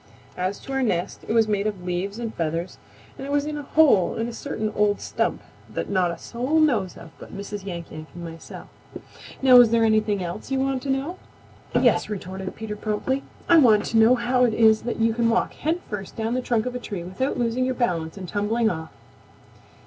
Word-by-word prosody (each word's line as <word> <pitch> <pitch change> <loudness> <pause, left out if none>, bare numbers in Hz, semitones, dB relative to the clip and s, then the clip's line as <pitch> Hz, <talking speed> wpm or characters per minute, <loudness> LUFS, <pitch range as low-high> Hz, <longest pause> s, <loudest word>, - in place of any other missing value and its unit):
As 185 +2 -2
to 270 - -9
our 270 0 0
nest, 180 -8 -1
it - - -2
was 225 -1 +4
made 205 -1 0
of 200 -4 -4
leaves 180 +3 -3
and 230 -2 -4
feathers 165 +2 -3 0.4
and 270 - -5
it - - -4
was 290 0 +1
in 305 0 -3
a 295 - -4
hole 280 - +4
in 225 +1 -2
a 240 - -6
certain 220 -4 -3
old 205 -1 +1
stump - - -2 0.3
that - - -4
not 185 -3 +2
a 170 - -4
soul 255 - -1
knows 230 - +2
of 170 -1 -12
but - - -10
Mrs. 200 0 -6
Yank 170 -3 -6
Yank 155 0 -8
and 175 - -7
myself. 165 -1 -9 0.8
Now 255 -2 +8
is 245 -2 +8
there 230 0 +3
anything 215 -3 +2
else 175 +6 -6
you 270 -1 0
want 270 -1 0
to 275 - -5
know?" 275 +7 -2 0.6
"Yes," - - +3
retorted 190 -2 -5
Peter 220 -1 -5
promptly. 215 +6 -2 0.3
"I 340 - +6
want 220 -8 +5
to 230 - +2
know 225 +3 +6
how 250 +1 +1
it 230 -3 +2
is 220 -1 +5
that - - -3
you 225 0 +2
can 230 0 +1
walk 235 +1 +1
head 320 +4 -1
first 195 -3 -6
down 225 +1 -2
the 255 - 0
trunk 235 -3 0
of 250 - -3
a 250 - -4
tree 200 -7 -6
without 190 +10 -2
losing 240 +1 0
your 255 0 0
balance 170 -9 -1
and 185 -2 -7
tumbling 220 +4 +1
off." 160 -2 -6
220 Hz, 220 wpm, -24 LUFS, 190-250 Hz, 0.8 s, Now